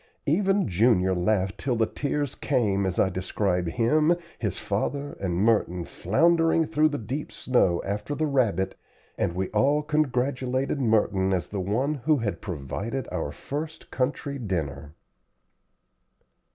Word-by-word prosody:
Even 195 Hz, +5 st, +2 dB
Junior 95 Hz, -1 st, +3 dB
laughed 95 Hz, +2 st, 0 dB
till 130 Hz, -3 st, 0 dB
the 115 Hz, -1 st, +2 dB
tears 145 Hz, +2 st, -2 dB
came 100 Hz, -8 st, +1 dB
as 90 Hz, -, -3 dB
I 95 Hz, -, +3 dB
described 90 Hz, -1 st, -1 dB
him, 150 Hz, -, +3 dB, 0.2 s
his 105 Hz, -4 st, -2 dB
father, 140 Hz, +8 st, -2 dB
and 90 Hz, -3 st, -1 dB
Merton, 90 Hz, -3 st, +2 dB
floundering 165 Hz, -, +2 dB
through 155 Hz, 0 st, +3 dB
the 145 Hz, -, -3 dB
deep 130 Hz, +6 st, -5 dB
snow 95 Hz, -9 st, +1 dB
after 105 Hz, +9 st, -3 dB
the 155 Hz, -, 0 dB
rabbit, 110 Hz, -, +1 dB, 0.4 s
and 85 Hz, -, -1 dB
we 95 Hz, +1 st, -1 dB
all 140 Hz, +8 st, +2 dB
congratulated 135 Hz, -2 st, 0 dB
Merton 105 Hz, -5 st, +2 dB
as 90 Hz, -, 0 dB
the 100 Hz, -, -3 dB
one 115 Hz, +10 st, 0 dB
who 150 Hz, +2 st, +1 dB
had 115 Hz, -5 st, -3 dB
provided 100 Hz, -, -4 dB
our 80 Hz, -5 st, -2 dB
first 155 Hz, -, -6 dB
country 140 Hz, +1 st, -2 dB
dinner. 80 Hz, -, -4 dB
115 Hz, 140 wpm, -26 LUFS, 95-145 Hz, 0.4 s, Junior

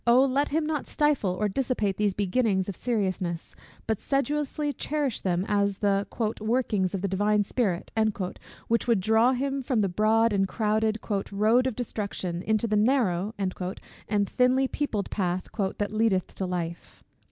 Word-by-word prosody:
let 265 Hz, +4 st, +4 dB
him 310 Hz, +2 st, 0 dB
not 300 Hz, -2 st, -2 dB
stifle 295 Hz, -9 st, +1 dB
or 210 Hz, -, +2 dB
dissipate 210 Hz, -3 st, -1 dB
these 205 Hz, -2 st, +1 dB
beginnings 200 Hz, -1 st, +1 dB
of 200 Hz, -, -4 dB
seriousness, 185 Hz, -7 st, -2 dB, 0.3 s
but 220 Hz, -2 st, -1 dB
sedulously 290 Hz, +1 st, -1 dB
cherish 290 Hz, -5 st, -2 dB
them 180 Hz, 0 st, 0 dB
as 200 Hz, -1 st, +1 dB
the 200 Hz, -1 st, +1 dB, 0.3 s
"workings 215 Hz, -5 st, 0 dB
of 190 Hz, -, -4 dB
the -, -, +2 dB
Divine 205 Hz, +2 st, +2 dB
Spirit," 195 Hz, -5 st, -1 dB, 0.8 s
which 230 Hz, +2 st, +1 dB
would 230 Hz, -4 st, +3 dB
draw 220 Hz, +6 st, +4 dB
him 275 Hz, +2 st, -1 dB
from 250 Hz, -4 st, 0 dB
the 200 Hz, -, +2 dB
"broad" 215 Hz, +4 st, +3 dB
and 195 Hz, -1 st, +2 dB
crowded 215 Hz, +1 st, 0 dB, 0.3 s
"road 220 Hz, +6 st, +3 dB
of 255 Hz, -, -2 dB
destruction 200 Hz, -7 st, -3 dB
into 220 Hz, +3 st, +1 dB
the 215 Hz, -2 st, 0 dB
narrow" 210 Hz, -4 st, +2 dB
and 190 Hz, -2 st, -1 dB, 0.7 s
thinly 255 Hz, +4 st, +3 dB
peopled 245 Hz, -8 st, -2 dB
path 180 Hz, -2 st, -1 dB, 0.3 s
"that 205 Hz, 0 st, -2 dB
leadeth 215 Hz, -4 st, +1 dB
to 190 Hz, -, -3 dB
life." 170 Hz, -2 st, -5 dB
215 Hz, 150 wpm, -27 LUFS, 195-250 Hz, 0.8 s, let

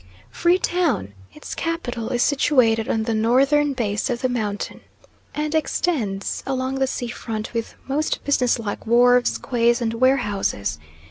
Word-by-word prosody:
Free 345 Hz, +1 st, +3 dB
Town 320 Hz, -, 0 dB, 0.2 s
its 150 Hz, -, -8 dB
capital 250 Hz, -9 st, -3 dB
is 245 Hz, -2 st, +1 dB
situated 250 Hz, -6 st, +2 dB
on 220 Hz, -, +1 dB
the 225 Hz, 0 st, -1 dB
northern 275 Hz, +6 st, +3 dB
base 220 Hz, -1 st, -1 dB
of 240 Hz, -1 st, -2 dB
the 255 Hz, -, +1 dB
mountain, 210 Hz, -4 st, -3 dB, 0.5 s
and 300 Hz, +1 st, -2 dB
extends 270 Hz, -, -1 dB
along 265 Hz, 0 st, -2 dB
the 265 Hz, -, +2 dB
sea 245 Hz, -2 st, -4 dB
front 225 Hz, -2 st, -5 dB
with 230 Hz, -1 st, -3 dB
most 295 Hz, +3 st, -1 dB
business 255 Hz, -4 st, +2 dB
like 220 Hz, -1 st, -5 dB
wharves, 245 Hz, +1 st, +4 dB
quays, 235 Hz, -1 st, +1 dB
and 230 Hz, -2 st, -1 dB
warehouses. 210 Hz, -, 0 dB
245 Hz, 145 wpm, -22 LUFS, 225-275 Hz, 0.5 s, wharves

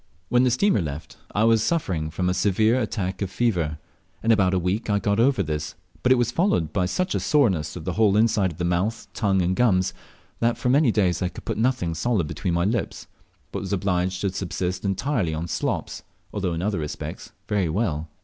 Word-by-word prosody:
When 125 Hz, +1 st, +4 dB
the 130 Hz, -, +4 dB
steamer 125 Hz, -, +2 dB
left, 75 Hz, -1 st, -6 dB, 0.2 s
I 105 Hz, -, +3 dB
was 115 Hz, -1 st, +4 dB
suffering 95 Hz, -, -1 dB
from 90 Hz, +3 st, -2 dB
a 90 Hz, -, +2 dB
severe 105 Hz, +6 st, +2 dB
attack 95 Hz, -4 st, -3 dB
of 100 Hz, -, -1 dB
fever. 90 Hz, -10 st, 0 dB, 0.5 s
In 115 Hz, -, +3 dB
about 95 Hz, -4 st, +3 dB
a -, -, +2 dB
week 90 Hz, +6 st, -1 dB
I 105 Hz, -, +3 dB
got 100 Hz, +1 st, 0 dB
over 125 Hz, -3 st, +3 dB
this, 75 Hz, -2 st, -4 dB, 0.3 s
but 125 Hz, -, +2 dB
it -, -, +8 dB
was 120 Hz, -1 st, +1 dB
followed 120 Hz, -, +1 dB
by 90 Hz, -2 st, +1 dB
such 185 Hz, -, -1 dB
a -, -, 0 dB
soreness 105 Hz, -, +2 dB
of -, -, -7 dB
the -, -, -1 dB
whole 105 Hz, -2 st, +3 dB
inside 105 Hz, -4 st, +3 dB
of 80 Hz, -, -12 dB
the 90 Hz, -, -1 dB
mouth, 90 Hz, +6 st, -1 dB
tongue, 95 Hz, -4 st, +1 dB
and 90 Hz, +2 st, +1 dB
gums, 95 Hz, -6 st, +2 dB, 0.5 s
that 115 Hz, 0 st, +1 dB
for 125 Hz, -, -1 dB
many 135 Hz, -1 st, +4 dB
days 95 Hz, -5 st, +1 dB
I 90 Hz, -, 0 dB
could -, -, -11 dB
put -, -, -3 dB
nothing 120 Hz, -8 st, +1 dB
solid 100 Hz, +1 st, 0 dB
between 85 Hz, +3 st, -2 dB
my 85 Hz, +1 st, +1 dB
lips, 110 Hz, +1 st, -2 dB, 0.5 s
but -, -, -3 dB
was 100 Hz, 0 st, -4 dB
obliged 90 Hz, -1 st, 0 dB
to 100 Hz, -, 0 dB
subsist 90 Hz, -1 st, -3 dB
entirely 100 Hz, -, 0 dB
on 80 Hz, +2 st, -3 dB
slops, -, -, -2 dB, 0.3 s
although 95 Hz, -4 st, -1 dB
in 85 Hz, -, -3 dB
other 105 Hz, -3 st, 0 dB
respects 75 Hz, -1 st, -6 dB, 0.2 s
very 100 Hz, -5 st, +1 dB
well. 80 Hz, -4 st, -1 dB
100 Hz, 215 wpm, -24 LUFS, 90-115 Hz, 0.5 s, it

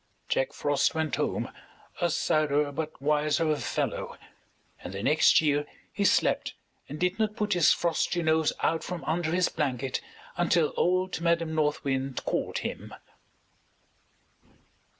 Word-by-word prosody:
Jack -, -, 0 dB
Frost 145 Hz, -, 0 dB
went 160 Hz, -1 st, -1 dB
home -, -, -2 dB, 0.5 s
a 175 Hz, -, +2 dB
sadder 150 Hz, -2 st, +1 dB
but 155 Hz, +2 st, -5 dB
wiser 150 Hz, +2 st, +1 dB
fellow -, -, -3 dB, 0.7 s
and 90 Hz, -, -7 dB
the 100 Hz, -, -4 dB
next 150 Hz, +4 st, +5 dB
year 145 Hz, -1 st, +1 dB, 0.3 s
he -, -, -1 dB
slept -, -, +2 dB, 0.3 s
and 150 Hz, +2 st, -6 dB
did 180 Hz, +4 st, 0 dB
not 215 Hz, -1 st, 0 dB
put 210 Hz, -2 st, 0 dB
his 175 Hz, -3 st, +5 dB
frosty 170 Hz, 0 st, 0 dB
nose 160 Hz, -1 st, +2 dB
out 165 Hz, 0 st, +1 dB
from 180 Hz, -2 st, -5 dB
under 160 Hz, 0 st, -1 dB
his 180 Hz, +1 st, +2 dB
blanket 135 Hz, -3 st, -2 dB, 0.4 s
until 175 Hz, -2 st, +2 dB
old 185 Hz, 0 st, +1 dB
Madam 170 Hz, -1 st, +1 dB
North 150 Hz, -2 st, 0 dB
Wind 135 Hz, -1 st, -2 dB
called -, -, -1 dB
him. -, -, -6 dB
155 Hz, 135 wpm, -28 LUFS, 145-175 Hz, 0.7 s, next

